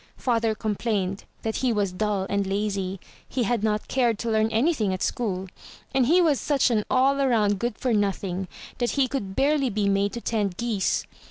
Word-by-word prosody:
Father 230 -3 +1
complained 210 -3 -2 0.2
that 220 -1 -1
he 255 -2 +1
was 205 -4 0
dull 200 0 -1
and 200 -1 0
lazy; 195 -1 -2 0.3
he 255 - 0
had 230 0 0
not 215 -1 0
cared 240 -4 +1
to 230 +1 -2
learn 220 0 +3
anything 225 - +1
at 185 - -4
school, 190 -5 -2 0.5
and 260 -3 +3
he 345 +6 +5
was 315 -6 +3
such 280 -4 +2
an 215 -2 +2
all 270 +2 +3
around 215 -7 +2
good 240 0 -2
for 250 -3 0
nothing 195 -3 -1 0.3
that 240 -1 +1
he 270 -2 +4
could 200 -8 -4
barely 275 -1 +2
be 210 -2 0
made 200 0 +1
to 235 - -4
tend 205 -6 -1
geese. 230 -5 0
220 Hz, 190 wpm, -25 LUFS, 200-245 Hz, 0.5 s, he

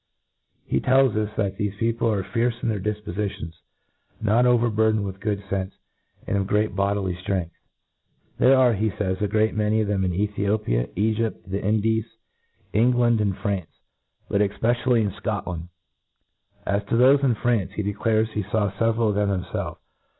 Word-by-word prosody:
He - - 0
tells 130 -3 +3
us, 105 -1 0
that 100 -3 -1
thefe 105 -1 -2
peo 115 +1 +1
ple 115 0 0
are 100 -3 -1
fierce 115 +5 0
in - - +1
their 105 -2 -1
difpofitions, 100 -3 -4 0.7
not 110 +3 +3
overbur 115 -3 +3
dened 110 -1 0
with 95 -1 -5
good 100 -2 -2
fenfe, 95 0 -2 0.5
and 100 - 0
of 95 - -1
great 105 -1 +1
bodily 100 -1 0
ftrcngth. 90 -1 -3 0.9
There 130 +2 +6
are, 125 -2 +5
he 110 +1 0
fays, 95 -2 -3
a 105 - +2
great 110 +2 +1
many 105 +1 +1
of 110 - 0
them 100 -2 0
in 90 - 0
Ethiopia, 100 - 0
Egypt, 110 0 -1
the 95 +1 -3
Indies, 110 +1 +1 0.7
England, 120 +1 +3 0.2
France, 100 -6 -1 0.6
but 100 - +1
efpecialJy 115 +4 +1
in 100 - -1
Scotland; 90 -5 -4 0.5
— - - -39
as 100 - -1
to 115 - -1
thofe 135 +4 +5
in 125 -4 +3
France, 115 -4 0
he 105 - -3
declares 110 +2 +1
lie 105 - 0
faw 105 0 -1
feveral 115 +2 +1
of 105 - 0
thenx 100 -3 -1
himfelf. - - -3
105 Hz, 170 wpm, -24 LUFS, 100-115 Hz, 0.9 s, There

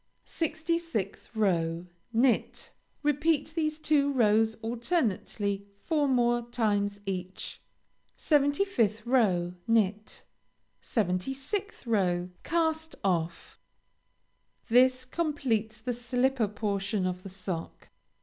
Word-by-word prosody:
66th 320 - -2
row 170 -5 +1 0.3
Knit. 240 +1 +1 0.3
Repeat 295 +1 +1
these 310 -2 0
two 290 -2 +2
rows 220 -3 +3
alternately 225 - -1 0.2
four 300 -3 +2
more 240 -2 +3
times 205 -4 0
each. 185 -1 -5 0.6
75th 285 - +2
row 190 -9 +2
Knit. 215 -2 +1 0.6
76th 270 - -2
row 180 -5 +1
Cast 320 -1 0
off. 170 -3 -1 1.1
This 255 +2 +4
completes 255 -8 -1
the 245 +2 -2
slipper 245 0 +1
portion 200 -1 -1
of 180 0 -2
the 195 - -8
sock. 180 -3 -6
230 Hz, 90 wpm, -29 LUFS, 200-285 Hz, 1.1 s, This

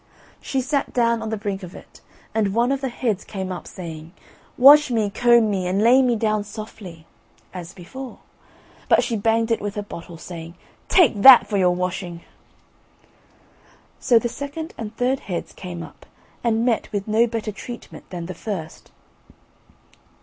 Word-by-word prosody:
She 270 - -1
sat 280 +2 -2
down 235 -2 +2
on 220 - -4
the 220 - -2
brink 200 -2 -4
of 180 -1 -10
it, - - -15 0.3
and 210 -2 0
one 240 +3 +2
of 275 0 -1
the 265 - -2
heads 230 -5 -2
came 190 -3 -5
up, 180 - -7
saying: 165 -2 -9 0.4
"Wash 290 +3 +8
me, 220 -4 0
comb 235 -1 +4
me, 185 -2 -1
and 185 +2 0
lay 240 +5 +6
me 250 -2 +2
down 215 -1 0
softly," 205 -5 -10 0.5
as 175 -1 -7
before, 250 +9 -9 0.7
but - - +5
she 235 - -2
banged 225 +2 +1
it 230 - +1
with 205 0 -4
her 205 - -3
bottle, 170 -3 -10
saying, 165 0 -9 0.3
"Take 270 - +4
that 260 +1 +10
for 205 - -2
your 180 -2 +3
washing." 180 -1 -4 1.8
So 240 - +4
the 235 - +1
second 285 +6 -6
and 220 0 -7
third 255 +2 +1
heads 180 -3 -5
came 175 -2 -7
up, - - -14 0.4
and 230 -1 +1
met 235 -3 0
with 205 -1 -3
no 220 +2 +3
better 225 -2 -3
treatment 235 +4 -10
than 175 -2 -6
the 185 - -6
first. 170 -4 -7
215 Hz, 170 wpm, -22 LUFS, 185-240 Hz, 1.8 s, that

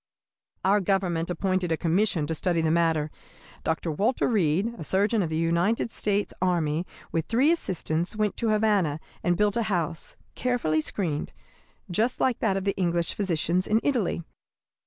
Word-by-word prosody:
"Our 200 +2 +4
Government 180 -3 0
appointed 185 0 0
a 160 - +2
commission 175 -1 +1
to 160 - -2
study 170 +1 0
the 160 -1 +1
matter. 160 -2 +2 0.5
Dr. 160 +1 -1
Walter 210 - +1
Reed, 195 0 +1
a - - -4
surgeon 205 +6 +2
of 170 - -1
the 160 - -1
United 170 +8 +1
States 205 0 -1
Army, 170 -2 +1 0.2
with 165 -1 -1
three 260 +7 +3
assistants, 175 - -1
went 210 -1 0
to 230 - 0
Havana 205 -8 +2 0.2
and 175 -1 +1
built 205 -1 +2
a 235 - +1
house, 170 -3 -2 0.2
carefully 230 -12 0
screened, 155 -3 -3 0.6
just 225 +8 +1
like 255 -3 +1
that 195 - +1
of 195 - -2
the 200 0 0
English 170 -2 0
physicians 180 -1 0
in 215 +1 +3
Italy. 225 -11 0
180 Hz, 160 wpm, -26 LUFS, 165-210 Hz, 0.6 s, Our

